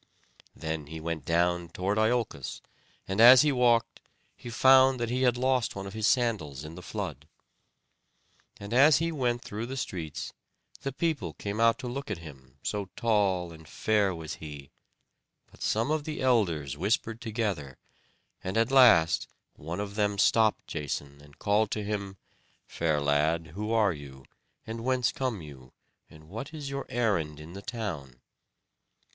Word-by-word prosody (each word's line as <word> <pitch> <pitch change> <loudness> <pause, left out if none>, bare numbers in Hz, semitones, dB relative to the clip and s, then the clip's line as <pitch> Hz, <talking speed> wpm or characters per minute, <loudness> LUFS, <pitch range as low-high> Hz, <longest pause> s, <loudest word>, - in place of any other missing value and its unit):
Then 80 -2 -4
he 80 +1 -7
went 80 -3 -4
down 85 +1 +1
toward 95 +5 -1
Iolcos, 110 - -1 0.4
and 95 +3 +1
as 125 +3 +10
he 150 - +3
walked, 120 -3 +2 0.4
he 120 - -9
found 130 +1 +5
that 120 -1 -2
he 125 +1 0
had 125 -2 +3
lost 130 -1 +1
one 95 0 -5
of 95 - -7
his 110 -1 0
sandals 100 - 0
in 75 - -8
the 90 - -9
flood. 75 -4 -6 1.3
And 100 +2 -6
as 140 +3 +7
he 165 +3 0
went 125 -5 -1
through 110 +3 -5
the 135 +2 -5
streets, 85 - -5 0.5
the 135 - -3
people 135 - -2
came 100 +1 -4
out 115 0 +4
to 130 -1 -6
look 135 +2 -5
at 105 - -2
him, 70 -5 -13
so 100 -2 -3
tall 100 -6 +1
and 80 -1 -14
fair 105 -1 +1
was 80 -2 -6
he; 75 -3 -9 0.8
but - - -19
some 115 +7 0
of 155 -1 0
the 155 0 -5
elders 85 - +1
whispered 110 +6 -1
together; 105 - -3 0.7
and 95 +3 -2
at 115 +3 +2
last 120 -12 +6 0.3
one 85 +5 -6
of 100 -1 -4
them 105 -1 0
stopped 110 +2 +3
Jason, 70 -2 -5
and 75 0 -18
called 105 +1 +2
to 105 - -3
him: 100 -2 -4 0.5
"Fair 80 -3 0
lad, 75 +3 +1
who 105 +4 -4
are 105 -5 +3
you, 70 -3 -11 0.4
and 115 +1 -6
whence 130 -1 +1
come 125 -9 -3
you; 65 -4 -13 0.4
and 75 0 -16
what 115 - -7
is 145 -3 -6
your 140 0 -4
errand 90 -11 0
in 80 +3 -10
the 100 - -8
town?" 85 - -5
105 Hz, 165 wpm, -28 LUFS, 80-120 Hz, 1.3 s, as